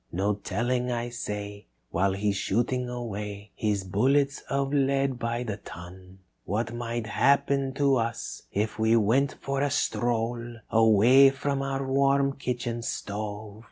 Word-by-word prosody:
No 100 Hz, +4 st, +1 dB
telling, 120 Hz, +5 st, -1 dB
I 120 Hz, 0 st, -2 dB
say, 105 Hz, -3 st, -6 dB, 0.2 s
while 95 Hz, +2 st, +1 dB
he's 100 Hz, +1 st, 0 dB
shooting 120 Hz, +5 st, 0 dB
away 105 Hz, -4 st, -6 dB
His 105 Hz, -3 st, 0 dB
bullets 135 Hz, +9 st, +1 dB
of 140 Hz, 0 st, 0 dB
lead 135 Hz, -2 st, +1 dB
by 120 Hz, +1 st, -2 dB
the 105 Hz, -4 st, -4 dB
ton. 90 Hz, 0 st, -11 dB, 0.3 s
"What 115 Hz, +4 st, -2 dB
might 120 Hz, -1 st, -3 dB
happen 135 Hz, +3 st, +2 dB
to 140 Hz, -2 st, +3 dB
us 115 Hz, 0 st, -3 dB
if 110 Hz, +2 st, -2 dB
we 110 Hz, +1 st, +4 dB
went 115 Hz, +6 st, +2 dB
for 135 Hz, 0 st, -2 dB
a 145 Hz, -, +2 dB
stroll 120 Hz, -3 st, -1 dB, 0.2 s
Away 115 Hz, +5 st, +6 dB
from 135 Hz, 0 st, -2 dB
our 135 Hz, 0 st, -2 dB
warm 140 Hz, +1 st, +2 dB
kitchen 120 Hz, -3 st, -3 dB
stove. 105 Hz, -1 st, -5 dB
120 Hz, 140 wpm, -27 LUFS, 105-135 Hz, 0.3 s, Away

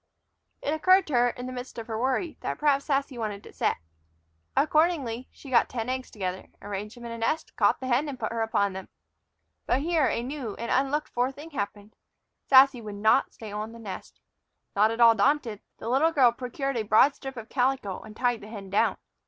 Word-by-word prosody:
It 290 Hz, -, 0 dB
occurred 370 Hz, +4 st, +4 dB
to 300 Hz, -, -6 dB
her, 245 Hz, 0 st, +4 dB
in 245 Hz, +1 st, -7 dB
the 255 Hz, -, -5 dB
midst 250 Hz, 0 st, -7 dB
of 230 Hz, -, -5 dB
her 225 Hz, -, -5 dB
worry, 265 Hz, +7 st, 0 dB
that -, -, -3 dB
perhaps 285 Hz, -2 st, +2 dB
Sassy 275 Hz, -3 st, -1 dB
wanted 210 Hz, -2 st, -4 dB
to -, -, -13 dB
set. -, -, 0 dB, 0.8 s
Accordingly 300 Hz, -6 st, +1 dB
she 275 Hz, -, -13 dB
got 240 Hz, -, +4 dB
ten 235 Hz, -1 st, -3 dB
eggs 260 Hz, 0 st, -3 dB
together, 185 Hz, -3 st, -4 dB
arranged 205 Hz, +3 st, -6 dB
them 240 Hz, -, -10 dB
in 235 Hz, -, -6 dB
a 230 Hz, -, -6 dB
nest, 305 Hz, +8 st, -1 dB
caught -, -, +3 dB
the 260 Hz, -, -6 dB
hen, 260 Hz, +4 st, +1 dB
and 265 Hz, -3 st, -7 dB
put 220 Hz, -, -2 dB
her 230 Hz, 0 st, -2 dB
upon 200 Hz, -3 st, +1 dB
them. 190 Hz, 0 st, -8 dB, 0.8 s
But 260 Hz, -, +2 dB
here 320 Hz, -2 st, +2 dB
a 235 Hz, -, -1 dB
new 255 Hz, -4 st, -5 dB
and 235 Hz, -, -4 dB
unlooked 275 Hz, +3 st, +1 dB
for 250 Hz, +2 st, 0 dB
thing 295 Hz, +4 st, -11 dB
happened. 205 Hz, -4 st, -5 dB, 0.5 s
Sassy 265 Hz, -2 st, +7 dB
would 210 Hz, -2 st, -7 dB
not 215 Hz, +2 st, +3 dB
stay 220 Hz, -2 st, -9 dB
on 215 Hz, +2 st, -5 dB
the -, -, -10 dB
nest. 195 Hz, -5 st, -8 dB, 0.6 s
Not 210 Hz, +2 st, +4 dB
at 230 Hz, +1 st, -2 dB
all 230 Hz, -1 st, +8 dB
daunted, 230 Hz, -1 st, +1 dB, 0.2 s
the -, -, -8 dB
little 275 Hz, +7 st, +3 dB
girl 260 Hz, -6 st, +5 dB
procured 250 Hz, +2 st, -3 dB
a -, -, +1 dB
broad 215 Hz, +6 st, +5 dB
strip 270 Hz, -2 st, -8 dB
of 225 Hz, +1 st, -8 dB
calico 255 Hz, -6 st, 0 dB
and 215 Hz, -1 st, -12 dB
tied 245 Hz, -2 st, +1 dB
the 210 Hz, -, -10 dB
hen 200 Hz, -3 st, -9 dB
down. 200 Hz, -, +2 dB
245 Hz, 215 wpm, -27 LUFS, 220-275 Hz, 0.8 s, all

